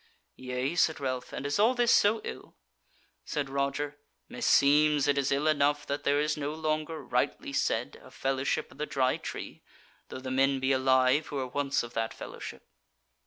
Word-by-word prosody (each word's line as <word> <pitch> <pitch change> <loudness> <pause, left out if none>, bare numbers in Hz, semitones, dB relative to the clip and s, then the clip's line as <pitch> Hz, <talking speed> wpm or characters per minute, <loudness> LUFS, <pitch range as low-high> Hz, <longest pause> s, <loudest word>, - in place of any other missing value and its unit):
"Yea," 130 +3 -3
said 165 -2 +2
Ralph, 130 -2 -3
"and - - -5
is 145 +6 -1
all 230 +5 +4
this 240 -1 +3
so 215 +2 +4
ill?" - - -8 0.7
Said 140 -2 -3
Roger, 140 +1 -2 0.3
"Meseems 145 0 +4
it 145 - +3
is 140 -2 0
ill 140 +2 +1
enough 145 -1 +2
that 145 +1 -4
there 145 +1 +3
is 150 +1 +1
no 150 0 -3
longer, 155 -1 -2
rightly 125 - -1
said, - - -1
a - - -13
Fellowship 135 0 -2
of - - -17
the 150 - -2
Dry 130 -2 +1
Tree, - - -7 0.5
though - - -6
the 130 0 -6
men 135 +1 +2
be 130 +1 +1
alive 130 +2 +3
who - - -7
were 135 -2 -1
once 140 +2 -1
of 120 0 -9
that 115 0 -2
fellowship." - - -9
140 Hz, 180 wpm, -29 LUFS, 130-150 Hz, 0.7 s, all